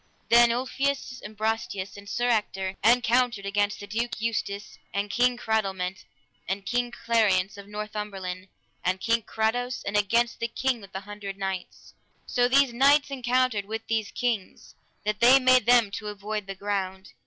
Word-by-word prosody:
Then 235 0 +7
Ulfius, 260 +1 -2
and 210 0 -10
Brastias, 215 -3 -2
and 200 0 -11
Sir 240 +3 0
Ector 195 -5 0
encountered 240 -1 +3
against 205 +1 0
the 205 - -7
Duke 230 +4 -3
Eustace, 210 -2 -3
and 200 +1 -2
King 245 0 +2
Cradelment, 195 -5 -2 0.4
and 195 +1 -3
King 245 +4 0
Clariance 215 -5 +1
of 200 0 -11
Northumberland, 205 -3 -5 0.4
and 185 +1 0
King 230 +3 +1
Carados, 245 +4 -1
and 200 - -3
against 235 +3 +2
the 230 - -1
King 250 0 -1
with 195 -1 -13
the 190 - -5
Hundred 200 -1 -7
Knights. 190 -2 -5 0.3
So 245 0 +2
these 270 -1 +4
knights 280 +3 +4
encountered 250 -4 +1
with 220 +2 -5
these 220 -2 -1
kings, 235 -6 -3 0.3
that 210 0 -1
they 255 +3 +7
made 255 -2 +4
them 240 -4 +5
to 210 +1 -5
avoid 210 0 -4
the 195 - -5
ground. 190 -1 -3
215 Hz, 160 wpm, -26 LUFS, 200-240 Hz, 0.4 s, Then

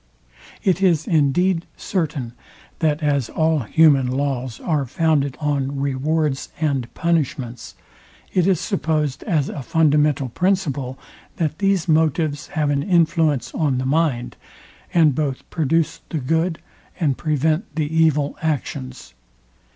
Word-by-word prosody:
It 190 0 +2
is 170 -5 +3
indeed 165 +3 +2
certain, 150 -10 -3 0.5
that 155 -1 0
as 140 -5 +1
all 160 -1 +1
human 140 +1 +4
laws 130 -2 -2
are 150 -5 -1
founded 145 -2 +1
on 140 -2 -1
rewards 140 +1 -1
and 140 -6 -1
punishments, 150 -7 -2 0.6
it 180 -1 +2
is 190 -4 +3
supposed 155 - -1
as 155 -8 +1
a 145 - -5
fundamental 150 -1 +2
principle, 145 - -1 0.4
that 155 -1 -2
these 195 -4 +1
motives 155 -2 +1
have 150 -2 +2
an 140 -1 +1
influence 165 -5 +2
on 145 -5 0
the 130 - -2
mind, 135 -4 0 0.5
and 160 -4 +4
both 140 -2 -3
produce 165 +1 0
the 160 - -2
good 160 +5 0 0.4
and 145 -6 +1
prevent 155 - 0
the 155 -1 0
evil 150 -3 +2
actions. 115 - -4
150 Hz, 125 wpm, -21 LUFS, 140-165 Hz, 0.6 s, human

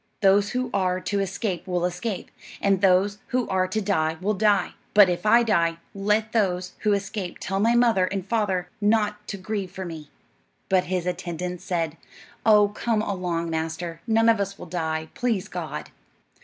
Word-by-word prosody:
Those 200 0 +4
who 250 -1 -1
are 185 -2 +1
to 200 +2 -2
escape 195 -2 -2
will 180 -1 0
escape, 180 +2 -4 0.3
and 195 -2 +2
those 195 +2 +3
who 250 -1 0
are 185 -1 +1
to 185 +4 -1
die 160 -6 0
will 200 +3 0
die; 205 -2 +2 0.2
but 205 -3 +8
if 180 +4 -2
I 235 +3 +6
die, 170 -7 +2 0.2
let 210 +2 0
those 185 -5 0
who 210 -1 +2
escape 200 -2 -3
tell 195 +1 -2
my 230 +3 +3
mother 230 -6 +4
and 190 0 -3
father 200 -5 0
not 210 0 +1
to 200 - -4
grieve 195 0 -3
for 190 +1 -7
me." 160 -4 -8 0.6
But 185 -1 +3
his 180 -1 -2
attendants 180 -1 -4
said, 165 -3 -1 0.5
"Oh, 210 -2 +6
come 215 +1 -1
along, 175 -4 -2
master; 165 +1 -3
none 225 0 +3
of 225 -2 +5
us 200 0 -2
will - - -9
die, 160 -2 -3
please 225 -6 -1
God." - - -6
195 Hz, 175 wpm, -25 LUFS, 180-210 Hz, 0.6 s, but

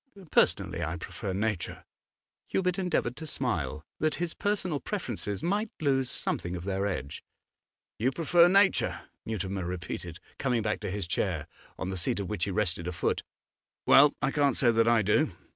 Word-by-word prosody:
Personally, 90 -1 +2
I 80 +2 -2
prefer 95 +4 -5
nature.' 105 -1 -2 0.6
Hubert 180 -1 0
endeavoured 160 -9 0
to 160 - -7
smile, 75 - -2
that 155 0 +1
his 170 +1 -3
personal 190 -7 -1
preferences 120 - -4
might 205 +5 0
lose 135 -4 +1
something 90 +1 -2
of 85 - -5
their 100 +1 -1
edge. 70 -8 -4 0.8
'You 125 +5 +2
prefer 170 +3 +5
nature,' 195 +2 +3 0.3
Mutimer 100 -3 -2
repeated, 90 -1 -5 0.2
coming 125 -4 +1
back 105 0 -1
to - - -4
his 100 0 -2
chair, 85 - -1 0.3
on 95 - -3
the 95 - -3
seat 85 - 0
of 100 - -3
which 105 - -1
he - - -3
rested 90 -3 0
a - - -1
foot. 85 - -1 0.6
'Well, 145 +1 +7
I - - +2
can't 145 -2 +2
say 120 -3 +5
that 115 0 +3
I 115 -2 +4
do. 110 - +2
110 Hz, 170 wpm, -29 LUFS, 95-155 Hz, 0.8 s, Well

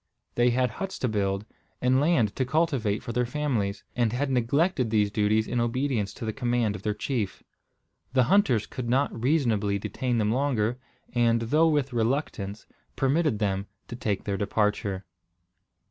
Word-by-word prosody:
They 120 +1 +3
had 125 0 +1
huts 195 - -5
to 130 - -1
build, 100 -2 -1 0.3
and 125 +1 +3
land 135 -10 +2
to 130 - +1
cultivate 130 -7 0
for 120 -2 -5
their 125 +1 +1
families, 120 -8 -1
and 120 -3 +2
had 135 +3 -1
neglected 130 +2 +1
these 105 -2 +2
duties 110 +1 +2
in 120 - -1
obedience 120 -3 0
to 115 - -6
the 110 - -2
command 120 -3 0
of - - -7
their 105 -1 -1
chief. 115 -7 -3 0.7
The 130 -1 +5
hunters 125 - +3
could 120 -2 -5
not 135 +4 +2
reasonably 115 -8 +2
detain 125 +4 -2
them 105 -1 +1
longer, 125 -3 0 0.3
and, 115 -1 +3
though 155 +8 +3
with 145 -4 +1
reluctance, 110 -4 -1 0.3
permitted 135 -1 +2
them 100 -1 -1 0.2
to - - -5
take 105 -4 -2
their 100 -1 -2
departure. 100 -1 0
120 Hz, 160 wpm, -27 LUFS, 105-135 Hz, 0.7 s, The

